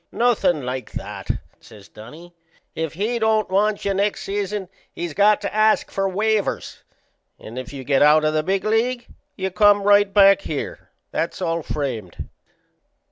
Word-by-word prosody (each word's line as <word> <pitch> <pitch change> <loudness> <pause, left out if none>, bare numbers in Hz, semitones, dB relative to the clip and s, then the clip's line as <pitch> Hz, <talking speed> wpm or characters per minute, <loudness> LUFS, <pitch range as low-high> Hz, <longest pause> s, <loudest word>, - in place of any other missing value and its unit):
"Nothin' 220 - +1
like 130 0 -5
that," - - -7 0.3
says 105 -4 -16
Dunnie. 150 +13 -13 0.4
"If 160 -2 -3
he 220 +7 -2
don't 220 -2 +1
want 205 +2 +1
you 200 - +1
next 200 +2 -1
season 200 -1 -3 0.2
he's 175 -3 -5
got 205 +3 +4
to 200 - -4
ask 215 0 +2
for 195 0 -1
waivers; 215 +2 -1 0.6
and 115 +4 -8
if 130 - -8
you 135 -2 -7
get 135 +1 +1
out 150 +1 +5
o' 155 - +2
the 155 0 +1
big 190 +4 -1
league 235 +3 0 0.3
you 190 0 -3
come 205 +1 +4
right 205 0 +4
back 195 +3 +6
here. - - -6 0.2
That's - - -3
all 165 -2 -1
framed." 125 - -5
195 Hz, 160 wpm, -21 LUFS, 155-210 Hz, 0.6 s, back